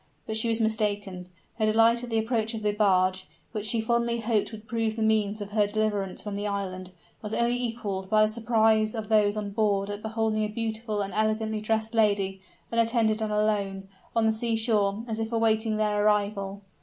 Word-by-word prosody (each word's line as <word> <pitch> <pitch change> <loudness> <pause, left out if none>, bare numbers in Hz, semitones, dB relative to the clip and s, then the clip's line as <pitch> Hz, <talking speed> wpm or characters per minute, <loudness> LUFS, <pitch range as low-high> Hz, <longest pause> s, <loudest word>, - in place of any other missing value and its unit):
But 220 - -3
she 220 +1 +2
was 225 0 +1
mistaken. 205 -4 -1 0.3
Her 215 - +2
delight 225 +2 +4
at 245 - -6
the 225 - 0
approach 225 0 0
of 215 - -6
the 210 - +2
barge, 185 -3 +2 0.2
which 215 -2 -4
she 230 +1 +2
fondly 235 +1 0
hoped 225 -2 0
would 220 0 -10
prove 225 -1 -1
the 225 - -1
means 215 -1 +1
of 205 0 -6
her 210 -1 +2
deliverance 205 -3 -1
from 205 -1 -5
the 205 +1 -2
island, 185 -2 -4 0.3
was 210 0 -3
only 235 +1 +2
equaled 205 -5 -3
by 215 0 +5
the - - +4
surprise 220 -1 +2
of 220 -2 -5
those 210 -1 +3
on 205 -1 -3
board 200 -1 0
at 205 0 -6
beholding 220 0 -1
a - - 0
beautiful 220 -1 -2
and 195 -1 -6
elegantly 215 0 0
dressed 220 +1 -1
lady, 200 -3 +1 0.3
unattended 230 -1 +2
and 215 -1 -1
alone, 200 -2 -1 0.3
on 230 -1 +3
the 220 - +3
seashore, 220 -2 0
as 225 -1 -3
if 225 0 -3
awaiting 220 -1 +1
their 210 -1 +1
arrival. 200 -1 0
215 Hz, 195 wpm, -27 LUFS, 205-225 Hz, 0.3 s, by